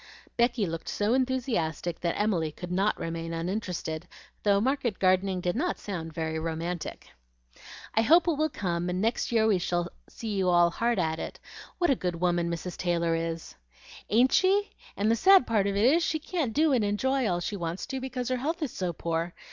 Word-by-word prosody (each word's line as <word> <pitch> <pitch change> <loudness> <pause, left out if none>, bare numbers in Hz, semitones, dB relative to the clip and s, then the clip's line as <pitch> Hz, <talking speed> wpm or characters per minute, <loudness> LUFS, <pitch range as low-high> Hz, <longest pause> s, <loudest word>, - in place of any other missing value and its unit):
Becky 235 -2 +2
looked 165 -2 -5
so 210 +3 +1
enthusiastic 240 - -1
that 170 -1 -1
Emily 180 -7 +1
could 180 +3 -8
not 195 +4 +1
remain 165 0 -4
uninterested, 175 -2 -3 0.3
though 200 -1 +3
market 245 -2 0
gardening 185 0 +2
did 175 +2 -1
not 350 +9 -1
sound 170 -5 -5
very 160 0 -3
romantic. 165 +1 -4 0.8
"I 225 - +3
hope 330 +10 +5
it - - +4
will 310 +1 +1
come, 175 - -2
and 180 +1 -1
next 225 +4 0
year 225 -2 +3
we 210 -4 +3
shall 175 0 -1 0.2
see 220 -2 -5
you 190 -2 +1
all 175 -1 +5
hard 235 +5 0
at 160 -3 0
it. - - -6 0.4
What 350 -4 +2
a - - +4
good 180 -5 -2
woman 175 -1 +1
Mrs. 170 +1 -4
Taylor 170 -2 0
is!" 165 0 -3 0.6
"Ain't 245 +5 +4
she? 395 +2 +3 0.3
and 210 +2 +2
the - - +4
sad 380 - +6
part 210 -3 +1
of 200 - -1
it 205 +3 +3
is, 310 +7 +5
she 315 - 0
can't 310 -5 -2
do 305 +4 +3
and 240 -4 +3
enjoy 255 +5 +1
all 175 -1 0
she 190 +4 -3
wants 170 -1 -4
to, 265 -1 -4
because 255 -1 -3
her 255 - +1
health 320 +6 -2
is 275 - -2
so 180 -2 -3
poor. 165 +1 -2
195 Hz, 200 wpm, -28 LUFS, 170-250 Hz, 0.8 s, sad